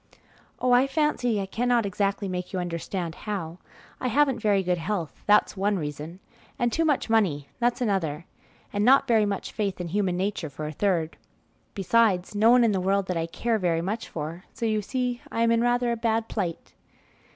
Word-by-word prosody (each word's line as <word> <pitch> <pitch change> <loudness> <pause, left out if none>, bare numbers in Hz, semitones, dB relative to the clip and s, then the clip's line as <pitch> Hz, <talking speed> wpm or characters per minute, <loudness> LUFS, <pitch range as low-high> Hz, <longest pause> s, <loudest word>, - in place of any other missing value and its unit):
"Oh, 255 - +1
I 250 +2 +5
fancy 270 -6 +1
I 195 - -2
cannot 235 +3 +1
exactly 200 +1 -1
make 180 -1 -4
you - - -1
understand 175 0 -3
how. 180 -4 -5 0.4
I 255 - -2
haven't 270 0 +2
very 205 -3 +2
good 180 -1 0
health, 170 -2 -3
that's 210 0 +4
one 200 +1 +1
reason; 150 +2 -6 0.4
and 240 -1 0
too 330 - +2
much 300 -4 +1
money, 185 -11 +1
that's 240 +1 +1
another; 170 -8 -1 0.5
and 205 0 0
not 270 +4 +5
very 220 -4 +3
much 200 -1 -3
faith 200 -4 -2
in 175 -1 -4
human 190 -1 0
nature, 190 -4 -2
for 150 +2 -6
a 150 - -4
third; 165 -1 0 0.6
besides, 195 -2 +2
no 215 +2 +4
one 245 0 +6
in 230 - +4
the 190 -2 0
world 195 +1 +1
that 180 - 0
I 165 0 -1
care 225 +6 -1
very 170 -3 0
much 215 +5 -3
for; 165 +3 -6
so 230 - -3
you 215 -1 +1
see 250 +2 -2
I 230 - 0
am 230 - +3
in 230 0 +3
rather 245 0 +2
a - - 0
bad 225 0 0
plight." 180 -6 -4
205 Hz, 195 wpm, -26 LUFS, 180-230 Hz, 0.6 s, one